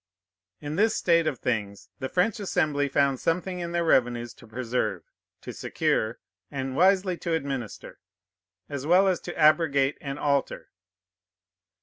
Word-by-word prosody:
In 145 +2 -5
this 220 +2 +3
state 170 -2 +3
of 145 -5 -1
things, 105 -4 -3
the 130 -2 -3
French 215 +5 +1
Assembly 150 -7 0
found 135 -1 +2
something 180 +2 -1
in 170 -1 -4
their 170 0 0
revenues 120 -6 +1
to - - -17
preserve, 125 +2 -2 0.4
to - - -7
secure, 150 -9 -1 0.3
and 135 -1 -4
wisely 185 +1 +3
to 170 -1 -3
administer, 135 -7 -5 0.7
as 140 0 -5
well 185 +3 +5
as 185 -2 +1
to 175 - -8
abrogate 150 -3 +3
and 140 -1 -5
alter. 140 -2 -1
145 Hz, 140 wpm, -26 LUFS, 130-175 Hz, 0.7 s, well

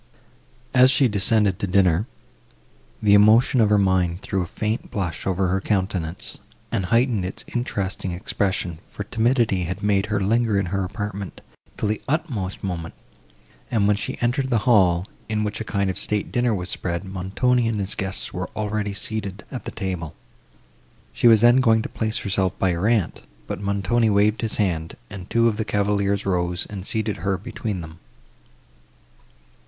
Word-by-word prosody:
As 130 0 +7
she 130 0 +4
descended 105 -2 +2
to 100 - -1
dinner, 95 +1 +3 1.0
the 105 -1 +5
emotion 110 +5 +6
of 105 - +4
her 105 - +4
mind 95 -2 +1
threw 95 - -1
a 90 - -3
faint 110 +6 -3
blush 90 -5 -3
over 95 -1 +1
her 95 +2 0
countenance, 95 -4 -2 0.3
and 95 - 0
heightened 115 -2 +2
its 90 - -5
interesting 100 -6 -2
expression; 95 -2 -2
for 105 - -6
timidity 115 -4 +1
had 90 +4 -5
made 100 0 +2
her 105 -1 0
linger 110 +1 +2
in 100 - 0
her 100 -1 0
apartment, 100 0 -5 0.4
till - - -1
the 105 0 -1
utmost 130 - -2
moment, 85 -4 -4 0.7
and, 110 -4 +2
when 105 - +4
she 100 - -4
entered 130 +3 0
the 115 -2 +1
hall, 95 -7 +4 0.2
in 105 -1 0
which 105 +1 -3
a - - -1
kind 100 -2 -1
of 95 - -2
state 105 -1 -1
dinner 120 -2 +1
was 90 -2 -3
spread, 85 +1 -2
Montoni 100 +6 0
and 110 -2 -1
his 100 0 -1
guests 95 0 -3
were 90 0 -4
already 105 -1 -2
seated 105 -1 -3
at 130 - -6
the - - -5
table. 90 -7 -4 1.0
She - - +3
was 110 -2 +7
then 120 +1 +6
going 115 -4 +4
to - - -5
place 110 0 -2
herself 95 -2 0
by 95 - +2
her 85 +4 0
aunt; 115 -6 +1 0.2
but - - -5
Montoni 100 +3 +1
waved 105 +2 +2
his 110 -2 -2
hand, 85 -6 -1 0.2
and 95 -1 -8
two 115 0 +3
of 110 -2 0
the 110 - 0
cavaliers 100 -1 0
rose, 90 -2 0
and 95 -2 -6
seated 110 -2 -1
her 95 +2 -1
between 100 0 -5
them. 80 0 -10
100 Hz, 175 wpm, -23 LUFS, 95-110 Hz, 1.0 s, As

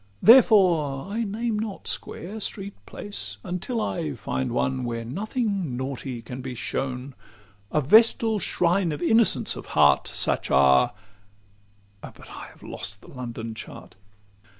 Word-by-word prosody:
Therefore 185 - +5
I 230 +3 -1
name 220 +1 -2
not 215 -2 -5
square, 200 +6 -5
street, 200 -1 -4
place, 105 - -7
until 180 +7 -3
I 85 - -2
Find 65 0 -3
one 65 0 0
where 115 -1 -3
nothing 200 - -2
naughty 130 -2 -5
can 125 +3 -7
be 130 -1 -6
shown, 125 +3 -3 0.6
A 150 - +2
vestal 220 - +4
shrine 175 0 +1
of 150 +3 -4
innocence 225 +3 +3
of - - -9
heart: 70 -1 +5
Such - - -1
are 65 -1 +4 1.1
but - - -12
I - - -8
have - - -18
lost 100 0 -6
the - - -15
London 115 -3 -6
Chart. 110 - -10
150 Hz, 135 wpm, -25 LUFS, -, 1.1 s, Therefore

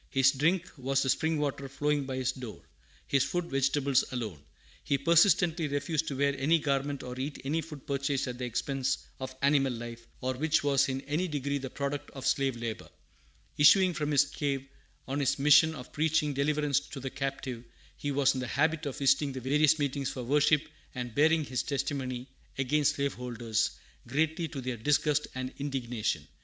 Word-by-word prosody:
His 135 -1 +4
drink 165 +7 +1
was 135 +1 +1
the 130 - +3
spring 160 +3 0
water 140 -2 -2
flowing 145 +1 0
by 130 -1 -4
his 130 -1 0
door; 125 -5 -9 0.4
his 140 -1 +2
food, 175 -1 -1
vegetables 135 0 +2
alone. 110 - -4 0.4
He 140 - +1
persistently 170 +1 +4
refused 145 +2 -1
to 140 - -3
wear 140 0 +2
any 160 +5 +4
garment 140 -1 -1
or 125 0 -7
eat 140 +2 -4
any 155 +4 0
food 150 -3 -10
purchased 140 0 -1
at 125 0 -5
the 125 - -2
expense 135 +2 -1 0.2
of 130 0 -6
animal 140 -2 +3
life, 115 -1 -7
or 130 +1 -1
which 155 +4 +1
was 140 -1 +3
in 135 0 -2
any 150 +6 -1
degree 140 -2 -2
the 130 -1 -5
product 140 +2 -4
of 135 - -6
slave 135 -2 +1
labor. 115 -2 -5 0.7
Issuing 180 +5 +6
from 150 -2 -2
his 145 -1 +4
cave, 140 -2 -2 0.4
on 135 +2 -2
his 140 -1 +1
mission 150 +3 +6
of 125 -3 -10
preaching 155 -1 +1
"deliverance 145 0 +1
to 145 -1 -9
the 135 0 -5
captive," 135 -3 -4 0.3
he 145 - -4
was 140 -1 +3
in 130 - -3
the 130 - -3
habit 155 +3 +1
of 135 - -5
visiting 140 0 +2
the 130 - -4
various 150 +4 +3
meetings 140 -2 -1
for 130 - -5
worship 145 +3 +3 0.3
and 125 -2 -4
bearing 160 +4 +4
his 130 -2 -1
testimony 130 -3 -3 0.3
against 145 +2 +2
slaveholders, 120 -5 -1 0.4
greatly 160 +6 0
to 140 -3 -6
their 125 -1 -3
disgust 150 +4 +1
and 130 0 -4
indignation. 125 -6 -2
140 Hz, 180 wpm, -30 LUFS, 130-150 Hz, 0.7 s, Issuing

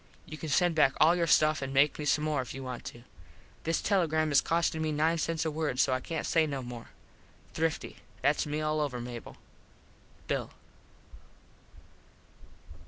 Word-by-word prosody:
You 155 - -8
can 155 0 -6
send 175 +4 +3
back 145 -4 +4
all 165 +3 +6
your 170 -1 0
stuff 155 0 +4
and 135 0 -4
make 140 +3 +3
me 150 - -3
some 150 +1 +2
more 155 -3 0
if 125 - -8
you 135 - -6
want 125 -2 -6
to. 120 - -9 0.6
This 165 0 0
telegram 160 -6 +1
is 140 - +5
costing 165 -1 0
me 155 -1 0
nine 160 +3 +1
cents 165 0 -1
a 160 - 0
word 150 -4 -2
so 135 - +3
I 130 - 0
cant 160 +4 -4
say 160 -2 +2
no 140 -3 -4
more 120 -1 -8
now. - - -19 0.6
Thrifty. 160 0 -2 0.3
Thats 150 +1 +2
me 150 +1 -2
all 155 0 0
over, 135 -4 -2
Mable. 120 -1 -8 0.9
Bill. - - -2
155 Hz, 180 wpm, -30 LUFS, 135-160 Hz, 0.9 s, all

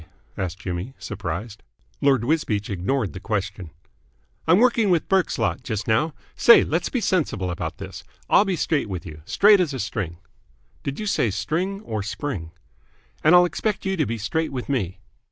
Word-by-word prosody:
asked 90 -2 -3
Jimmy, 95 +9 -5
surprised. 105 +1 -5 0.4
Lord 135 -4 +3
Wisbeach 115 -8 0
ignored 100 +4 -1
the 95 - -6
question. 100 -4 -3 0.8
"I'm 170 +3 +6
working 230 -2 +4
with 175 -3 +2
Burke's 190 -3 +2
lot - - 0
just 110 -5 -4
now. 150 +8 +1 0.2
Say, 235 - +7
let's 165 +3 -1
be 255 - -1
sensible 150 - 0
about 85 - -4
this. - - -8 0.2
I'll - - +6
be 195 -3 -1
straight 150 -7 0
with 90 -3 -5
you, 80 -2 -9
straight 205 - +5
as 160 -7 0
a - - -4
string." 100 -6 -3 0.6
"Did 140 0 -4
you 215 - -3
say 200 - +1
string 165 - -2
or 110 - -3
spring?" 100 - -4 0.7
"And 155 +3 +7
I'll 180 0 +8
expect 205 +3 -2
you 190 0 0
to 155 -6 0
be 115 - -2
straight 160 +10 -1
with 125 -2 -4
me." 100 -9 -1
130 Hz, 175 wpm, -23 LUFS, -, 0.8 s, I'll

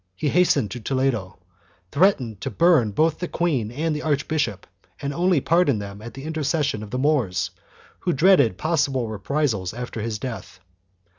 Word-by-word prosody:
He 145 - -1
has 180 +5 +4
tened 105 - +2
to 120 - -6
Toledo, 125 -6 -1 0.5
threatening 140 - +2
to 95 - -4
burn 165 -10 +4
both 155 +9 +1
the 180 - -3
queen 145 -13 0
and 155 +4 -1
the 150 - -3
archbishop, 145 - -1 0.3
and 140 0 -3
only 175 0 +2
pardoned 165 -9 +2
them 100 0 -8
at 120 +3 -9
the 135 - -8
intercession 150 -5 -1
of 105 - -8
the 125 - -3
Moors, 120 - +1 0.5
who 180 - 0
dreaded 155 - +4
possible 140 -6 0
reprisals 110 -3 -1
after 120 -2 -5
his 110 -1 -3
death. 115 -4 -7
135 Hz, 165 wpm, -23 LUFS, 110-160 Hz, 0.5 s, has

